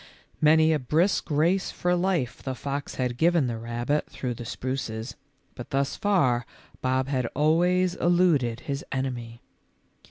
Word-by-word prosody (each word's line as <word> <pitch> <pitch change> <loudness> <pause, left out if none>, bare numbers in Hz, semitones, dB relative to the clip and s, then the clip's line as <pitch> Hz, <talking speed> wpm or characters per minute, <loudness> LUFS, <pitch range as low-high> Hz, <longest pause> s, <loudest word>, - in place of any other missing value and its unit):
Many 160 +1 +5
a 155 - +1
brisk 160 +11 +1
race 165 +6 +2
for 180 0 0
life 175 -8 -1
the 130 -1 -4
fox 140 +2 -4
had 125 -2 -2
given 170 -3 +3
the 115 -2 -3
rabbit 120 +5 -2
through 125 -2 -4
the 120 0 -8
spruces, 115 -2 -4 0.4
but 120 - -9
thus 140 +1 0
far 135 -13 +2 0.4
Bob 130 0 0
had 130 -4 0
always 175 +4 +3
eluded 170 -11 +2
his 140 0 -4
enemy. 120 -3 -4
140 Hz, 140 wpm, -26 LUFS, 125-165 Hz, 0.4 s, Many